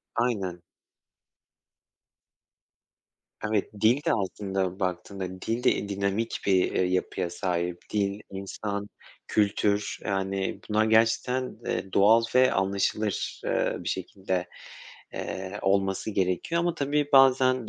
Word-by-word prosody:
Aynen. 100 Hz, -8 st, -1 dB, 2.9 s
Evet, 105 Hz, -2 st, 0 dB
dil 115 Hz, +4 st, +5 dB
de -, -, +3 dB
aslında 95 Hz, -2 st, -2 dB
baktığında 95 Hz, 0 st, -4 dB
dil 115 Hz, +2 st, -2 dB
de, -, -, +5 dB
iii, 100 Hz, -, -2 dB
dinamik 100 Hz, +3 st, -1 dB
bir, 95 Hz, -2 st, +3 dB
eee, -, -, +1 dB
yapıya 90 Hz, -1 st, -1 dB
sahip. 90 Hz, -1 st, -2 dB, 0.2 s
Dil, 100 Hz, -1 st, 0 dB
insan, 100 Hz, +1 st, -4 dB, 0.4 s
kültür, 105 Hz, 0 st, +1 dB
yani, 95 Hz, -1 st, -1 dB
bunlar 110 Hz, +1 st, +3 dB
gerçekten, 115 Hz, +3 st, +2 dB
eee, 95 Hz, +1 st, -3 dB
doğal 110 Hz, +4 st, +6 dB
ve 130 Hz, 0 st, +6 dB
anlaşılır, 100 Hz, +2 st, -1 dB
eee, -, -, +1 dB
bir -, -, -4 dB
şekilde, 95 Hz, -2 st, -3 dB, 0.7 s
eee, 95 Hz, +2 st, -5 dB
olması 95 Hz, +2 st, +1 dB
gerekiyor 95 Hz, -, 0 dB
ama 175 Hz, -1 st, 0 dB
tabii 145 Hz, -1 st, 0 dB
bazen, 130 Hz, -3 st, +5 dB
100 Hz, 110 wpm, -27 LUFS, 95-115 Hz, 2.9 s, doğal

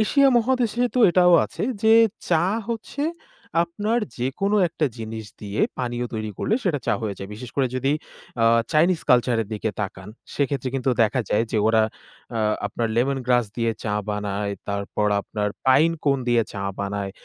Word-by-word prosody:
Asia 275 Hz, +5 st, +4 dB
মহাদেশে 245 Hz, 0 st, +1 dB
তো 255 Hz, -, +1 dB
এটাও 180 Hz, 0 st, +5 dB
আছে -, -, -6 dB, 0.2 s
যে 220 Hz, 0 st, +5 dB, 0.4 s
চা 165 Hz, -1 st, +4 dB, 0.2 s
হচ্ছে 235 Hz, +5 st, -3 dB, 0.6 s
আপনার 210 Hz, +7 st, -1 dB, 0.2 s
যেকোনো 195 Hz, +12 st, 0 dB
একটা 160 Hz, -1 st, -1 dB
জিনিস 110 Hz, -1 st, -6 dB
দিয়ে 100 Hz, 0 st, -4 dB, 0.2 s
পানীয় 120 Hz, -1 st, -2 dB
তৈরি 110 Hz, -1 st, -3 dB
করলে 220 Hz, -, +1 dB
সেটা 165 Hz, -7 st, +1 dB
চা -, -, +2 dB
হয়ে 105 Hz, -3 st, -3 dB
যায়। 95 Hz, -, -7 dB
বিশেষ 120 Hz, +3 st, -9 dB
করে 135 Hz, -, +3 dB
যদি 135 Hz, +3 st, +1 dB, 0.5 s
আ -, -, +5 dB, 0.3 s
চাইনিজ 165 Hz, +2 st, +3 dB
কালচার 125 Hz, -1 st, +4 dB
এর 105 Hz, -, -11 dB
দিকে 105 Hz, +1 st, -2 dB
তাকান, 95 Hz, -1 st, -5 dB, 0.3 s
সেক্ষেত্রে 140 Hz, -2 st, -1 dB
কিন্তু 130 Hz, 0 st, 0 dB
দেখা 115 Hz, +4 st, +1 dB
যায় 110 Hz, -, +2 dB
যে 110 Hz, -, +2 dB
ওরা 110 Hz, -1 st, +4 dB, 0.5 s
আ -, -, 0 dB, 0.3 s
আপনার 115 Hz, +3 st, -2 dB
লেমন 135 Hz, +3 st, +2 dB
গ্রাস 120 Hz, -3 st, +3 dB
দিয়ে 115 Hz, -1 st, +1 dB
চা 105 Hz, -, -1 dB, 0.2 s
বানায়। 105 Hz, 0 st, -2 dB, 0.2 s
তারপর 100 Hz, +1 st, -1 dB
আপনার 105 Hz, +1 st, -3 dB, 0.2 s
পাইন 140 Hz, +6 st, +5 dB
কোন 140 Hz, -2 st, +3 dB
দিয়ে 120 Hz, -1 st, +4 dB
চা 100 Hz, -, -5 dB, 0.2 s
বানায়। 100 Hz, 0 st, -3 dB
125 Hz, 170 wpm, -23 LUFS, 105-165 Hz, 0.6 s, এটাও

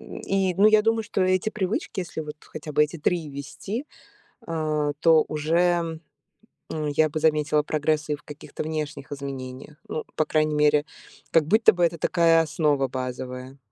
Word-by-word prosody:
И, 190 Hz, -2 st, -2 dB
ну, 205 Hz, +2 st, +6 dB
я 215 Hz, -1 st, +5 dB
думаю, 225 Hz, 0 st, +2 dB
что 210 Hz, -3 st, -1 dB
эти 185 Hz, +3 st, +1 dB
привычки, 195 Hz, 0 st, -2 dB
если 175 Hz, -3 st, -5 dB
вот 150 Hz, 0 st, -7 dB
хотя 155 Hz, 0 st, -9 dB
бы 150 Hz, +1 st, +5 dB
эти 155 Hz, +3 st, -7 dB
3 160 Hz, 0 st, 0 dB
ввести, 150 Hz, -, -6 dB, 0.6 s
а, 155 Hz, -2 st, -1 dB
то 160 Hz, -2 st, +5 dB
уже, 165 Hz, +1 st, +1 dB, 0.7 s
м, 155 Hz, -1 st, -2 dB
я 155 Hz, +1 st, +2 dB
бы 155 Hz, -, -3 dB
заметила 150 Hz, -1 st, +2 dB
прогресс 155 Hz, 0 st, 0 dB
и 150 Hz, -, +1 dB
в -, -, -19 dB
каких-то 150 Hz, +1 st, -8 dB
внешних 150 Hz, -3 st, -5 dB
изменениях. 140 Hz, +1 st, -7 dB
Ну, 155 Hz, -, -4 dB
по 155 Hz, -, +1 dB
крайней 155 Hz, 0 st, +1 dB
мере, 150 Hz, 0 st, +3 dB, 0.5 s
как 160 Hz, -3 st, +4 dB
будто 220 Hz, +7 st, +5 dB
бы 175 Hz, -1 st, 0 dB
это 170 Hz, 0 st, -1 dB
такая 165 Hz, -2 st, +4 dB
основа 150 Hz, -3 st, +1 dB
базовая. 130 Hz, +1 st, -6 dB
155 Hz, 165 wpm, -25 LUFS, 150-170 Hz, 0.7 s, ну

